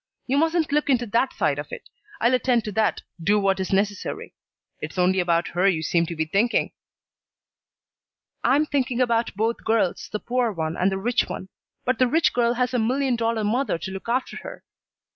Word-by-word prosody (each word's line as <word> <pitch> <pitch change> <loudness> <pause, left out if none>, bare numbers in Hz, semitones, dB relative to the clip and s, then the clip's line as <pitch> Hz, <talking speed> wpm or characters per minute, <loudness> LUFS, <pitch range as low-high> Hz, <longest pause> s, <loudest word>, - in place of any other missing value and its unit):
You 260 - 0
mustn't 325 -1 +1
look 295 0 +1
into 245 -3 +2
that 235 +4 +1
side - - 0
of - - -7
it. - - -8 0.3
I'll 235 +2 +3
attend 250 -2 +2
to 215 - -4
that, 220 +2 0 0.2
do 210 +4 +3
what 195 -1 +1
is 190 - -3
necessary. 200 +1 -1 0.5
It's - - -7
only 185 +1 +3
about 170 -1 +1
her 180 +3 +1
you 165 -5 +1
seem 170 +1 +1
to 170 - -5
be 160 0 -1
thinking." 205 +9 +1 1.7
"I'm 275 +6 +3
thinking 260 -4 -1
about 235 -3 +1
both 225 +3 -1
girls, 220 -5 0
the 210 - -2
poor 245 0 0
one 160 -3 -3
and 185 +2 +1
the 190 - -1
rich 240 +5 0
one. 190 - -6 0.4
But 250 -2 0
the 255 - +4
rich 325 +6 +2
girl 240 0 +2
has 250 +1 0
a 250 - +2
million 255 +3 +1
dollar 230 -1 0
mother 235 -1 0
to 190 - -6
look 190 +4 -7
after 255 +2 -1
her. - - -9
230 Hz, 200 wpm, -24 LUFS, 190-255 Hz, 1.7 s, the